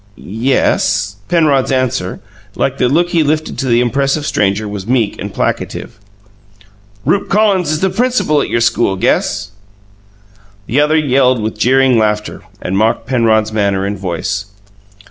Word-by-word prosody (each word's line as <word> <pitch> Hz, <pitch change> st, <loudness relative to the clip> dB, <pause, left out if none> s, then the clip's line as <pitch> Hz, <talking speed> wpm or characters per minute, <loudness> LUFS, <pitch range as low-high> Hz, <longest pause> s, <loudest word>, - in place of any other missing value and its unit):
"Ye 115 Hz, +7 st, -2 dB
es." 100 Hz, -4 st, +1 dB
Penrod's 150 Hz, -7 st, +2 dB
answer, 130 Hz, -8 st, -1 dB, 0.3 s
like -, -, -1 dB
the 125 Hz, -, +2 dB
look 170 Hz, +5 st, +2 dB
he 170 Hz, -2 st, +2 dB
lifted 155 Hz, +1 st, -1 dB
to 135 Hz, -, -2 dB
the 120 Hz, -1 st, +3 dB
impressive 135 Hz, +4 st, 0 dB
stranger, 105 Hz, -1 st, 0 dB
was 100 Hz, -1 st, -6 dB
meek 120 Hz, -4 st, +1 dB
and -, -, -5 dB
placative. -, -, -3 dB, 1.1 s
"Rupe 200 Hz, -, 0 dB
Collins 195 Hz, -5 st, +2 dB
is 155 Hz, -, -1 dB
the 190 Hz, -1 st, +1 dB
principal 225 Hz, -, +1 dB
at -, -, -3 dB
your 120 Hz, -, 0 dB
school, 115 Hz, -3 st, +1 dB
guess." 100 Hz, +1 st, 0 dB, 1.1 s
The 135 Hz, +7 st, +1 dB
other 155 Hz, +2 st, +2 dB
yelled 130 Hz, -4 st, +2 dB
with 110 Hz, 0 st, -3 dB
jeering 130 Hz, 0 st, +3 dB
laughter, 105 Hz, -1 st, -1 dB, 0.2 s
and 95 Hz, -, -3 dB
mocked 110 Hz, +1 st, +1 dB
Penrod's 110 Hz, -4 st, +1 dB
manner 100 Hz, -2 st, 0 dB
and 100 Hz, +1 st, -2 dB
voice. 95 Hz, +1 st, -3 dB
125 Hz, 150 wpm, -15 LUFS, 105-145 Hz, 1.1 s, the